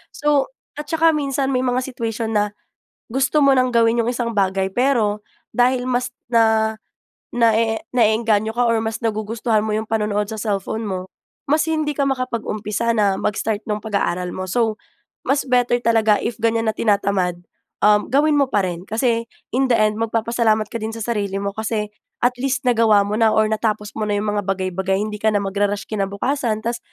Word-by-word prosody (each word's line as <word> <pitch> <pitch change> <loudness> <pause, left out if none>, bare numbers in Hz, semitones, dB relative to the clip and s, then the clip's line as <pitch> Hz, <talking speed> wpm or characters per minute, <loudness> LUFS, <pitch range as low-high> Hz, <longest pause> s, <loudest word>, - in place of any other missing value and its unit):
So, 295 - +1 0.3
at 295 - -6
tsaka 325 0 +4
minsan 275 -2 -1
may 255 - +2
mga 255 0 0
situation 230 -3 -3
na, 210 0 +1 0.6
gusto 265 +4 +1
mo 275 - +6
ng 255 0 +2
gawin 230 0 +3
yong 235 - 0
isang 240 -1 -2
bagay, 190 -1 +1
pero 220 -3 +1 0.3
dahil 250 0 +2
mas 250 0 0 0.2
na 220 -2 +3 0.6
naee 225 -1 +2
na-eengganyo 220 -2 +2
ka 245 0 +2
or 230 - +2
mas 220 0 -3
nagugustuhan 220 0 0
mo 215 - -1
yong 220 +1 -2
panonood 210 -1 0
sa 220 - -5
cellphone 210 +1 -2
mo, 185 -1 -4 0.4
mas 300 +3 +3
hindi 310 -2 0
ka 285 - 0
makapag-umpisa 235 -4 -2
na 205 -3 +2
mag-start 210 +1 -1
nung 210 - 0
pag-aaral 180 -4 -1
mo. 185 - -4
So, 225 +1 +1 0.5
mas 275 0 +2
better 245 -1 +2
talaga 220 -3 +3
if 235 - -3
ganyan 230 0 +1
na - - -6
tinatamad, 200 -4 +1 0.4
um, 210 0 +4
gawin 295 +2 +3
mo 280 - +3
pa 205 - +2
rin. 175 -2 -3
Kasi 230 +1 0 0.2
in 265 +3 +1
the - - +5
end 215 -1 +2
magpapasalamat 225 -1 +1
ka 230 - -4
din 220 0 -4
sa 225 - -5
sarili 205 -4 -2
mo. 200 - -1
Kasi, 220 0 -2 0.4
at 245 +1 +3
least, 275 +1 -1
nagawa 225 -4 +4
mo 205 - -2
na 225 -1 +5
or 215 0 +4
natapos 215 -1 -1
mo 215 - -1
na 205 - 0
yong 210 0 -1
mga - - -1
bagay-bagay. 190 0 -1
Hindi 210 0 -4
ka 220 - +3
na 205 - +1
magra-rush 200 +1 -1
kinabukasan, 215 +3 -1
tas, 235 +1 -1
220 Hz, 185 wpm, -20 LUFS, 210-245 Hz, 0.6 s, mo